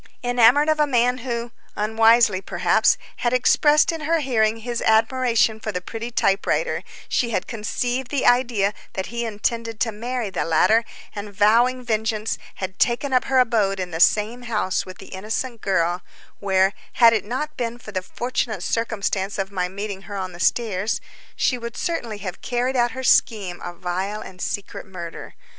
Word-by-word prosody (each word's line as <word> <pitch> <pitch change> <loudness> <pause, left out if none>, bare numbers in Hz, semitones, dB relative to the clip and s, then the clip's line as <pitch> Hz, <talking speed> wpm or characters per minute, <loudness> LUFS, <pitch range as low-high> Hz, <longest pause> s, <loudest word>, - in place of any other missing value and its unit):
Enamoured 245 +4 +5
of 310 -1 +2
a 300 - +4
man 250 -1 +2
who—unwisely, 230 -3 +1
perhaps—had 240 +4 +1
expressed 295 +5 +4
in 325 -1 -5
her 325 +2 +1
hearing 225 -6 +1
his 235 +1 -4
admiration 225 0 +2
for 215 - -4
the 180 - -2
pretty 225 +6 -6
typewriter, 235 - +1 0.3
she 240 - 0
had 225 - -1
conceived 245 +3 -2
the 280 -3 -1
idea 235 -5 +3 0.2
that 190 +4 -5
he 235 0 -2
intended 225 +1 -2
to 230 - +1
marry 235 0 -4
the - - -1
latter, 215 +8 +3 0.3
and, 205 0 -6
vowing 235 +6 +3
vengeance, 220 -1 -1 0.2
had 190 -1 -6
taken 255 +3 +1
up 255 0 +3
her 265 - +1
abode 220 -6 +2
in 180 -1 -4
the 160 - -4
same 215 +7 +3
house 215 -7 -1
with 185 - -9
the 195 - -12
innocent 220 +4 -4
girl, 175 -2 +1 0.4
where, 190 0 +2 0.2
had 230 -2 +6
it 220 - +1
not 265 +8 -4
been 235 -1 -3
for 225 -3 -11
the 185 -2 -2
fortunate 220 0 -3
circumstance 205 -3 -1
of 195 0 -3
my 180 -2 -1
meeting 200 0 -5
her 200 - -5
on 185 -1 -4
the 175 - -11
stairs, 215 0 0 0.4
she 250 - +1
would 235 0 -7
certainly 235 -11 -3
have 190 -3 -7
carried 250 +1 -1
out 240 -1 +2
her 260 0 -5
scheme 200 -8 +2
of 175 0 -7
vile 190 +4 -3
and 180 -1 -10
secret 200 -1 -4
murder. 175 -3 -8
225 Hz, 170 wpm, -22 LUFS, 195-245 Hz, 0.4 s, had